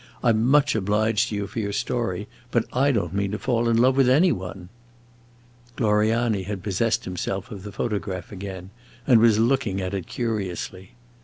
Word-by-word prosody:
"I 120 - +4
'm 110 +1 +1
much 145 +1 +4
obliged 110 +2 +1
to 105 - -3
you 100 0 -2
for 105 +3 -5
your 100 -2 -2
story, 105 -3 -2 0.2
but 120 -2 +1
I 140 +3 +3
don't 95 - -1
mean 100 0 0
to - - -1
fall 120 0 0
in 115 - +3
love 130 +3 +4
with 135 -2 +4
any 165 +8 +5
one." 90 0 -6 1.1
Gloriani 110 -1 +2
had 95 -1 -5
possessed 110 +3 0
himself 95 +1 -4
of 100 -3 -7
the 105 +1 -8
photograph 100 -4 -3
again, 95 -1 -7 0.3
and 125 -4 +6
was 110 -2 +5
looking 115 -4 +1
at 95 0 -3
it 95 -4 -4
curiously. 95 -5 -4
105 Hz, 180 wpm, -24 LUFS, 95-120 Hz, 1.1 s, and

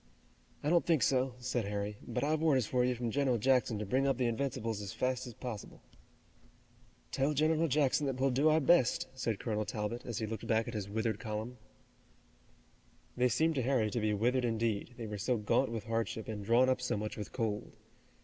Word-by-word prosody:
"I 150 - +1
don't 170 -1 +4
think 165 -5 +2
so," 130 -1 +2
said 125 -2 -2
Harry, 105 0 -3
"but 120 - -3
I've 155 +1 +1
orders 140 -7 +3
for 125 +3 +1
you 125 0 +1
from 120 -1 -3
General 135 -2 +2
Jackson 125 -1 +2
to 105 - -3
bring 130 +7 +1
up 135 -3 +1
the 125 - +1
Invincibles 115 -3 -2
as 100 -2 -6
fast 130 0 -1
as 120 - -9
possible." 120 -6 -7 1.3
"Tell 140 +2 +1
General 155 +3 +2
Jackson 145 0 +2
that 130 -1 -2
we'll 135 0 +2
do 140 +5 +3
our 155 +1 +4
best," 150 -4 +3
said 115 -5 -2
Colonel 110 -2 -1
Talbot, 105 +3 -4
as 120 -4 -5
he 110 - -1
looked 110 0 -5
back 110 0 +2
at 120 - -5
his 100 -2 -4
withered 110 0 -1
column. 110 +3 -5 1.6
They 125 0 +3
seemed 160 +6 +2
to 135 - 0
Harry 120 -4 +1
to 120 - -1
be 105 0 +1
withered 120 +5 +1
indeed, 115 0 -1
they 115 - -5
were 105 -1 -5
so 120 +4 +1
gaunt 105 0 +1
with 115 -3 -4
hardship 115 0 -2
and 105 -2 -5
drawn 120 +5 +4
up 130 -1 +1
so 125 - -1
much 105 +1 -4
with 105 - -6
cold. 110 -4 -3
120 Hz, 205 wpm, -33 LUFS, 110-130 Hz, 1.6 s, don't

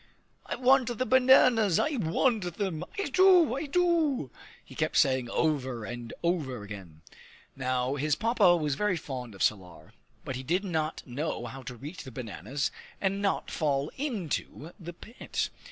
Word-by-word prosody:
"I - - -2
want 260 0 +4
the 255 - 0
bananas; 250 -7 +5
I 310 - +1
want 185 0 0
them; 185 -6 -2
I 400 - 0
do, 360 -4 +6
I 285 +3 -3
do!" 315 - +1 0.3
he - - -13
kept - - -1
saying 130 -3 +3
over 130 -6 -1
and 120 0 -7
over 145 - -1
again. 95 -7 -10 0.5
Now 130 0 -1
his 145 +1 0
Papa 215 -5 +4
was 150 -3 -1
very 185 +4 0
fond 125 -7 -6
of 95 - -2
Salar, 95 -4 -2 0.3
but 130 - -4
he - - -5
did 175 +9 0
not 160 -4 -2
know 130 -1 -3
how 130 +3 -7
to 125 0 -8
reach 150 +9 -8
the 130 - -9
bananas 125 +4 -3 0.3
and 195 0 0
not 200 -1 -1
fall 145 -2 0
into 195 - -4
the 175 -1 -8
pit. 225 +8 -4
160 Hz, 160 wpm, -29 LUFS, -, 0.5 s, do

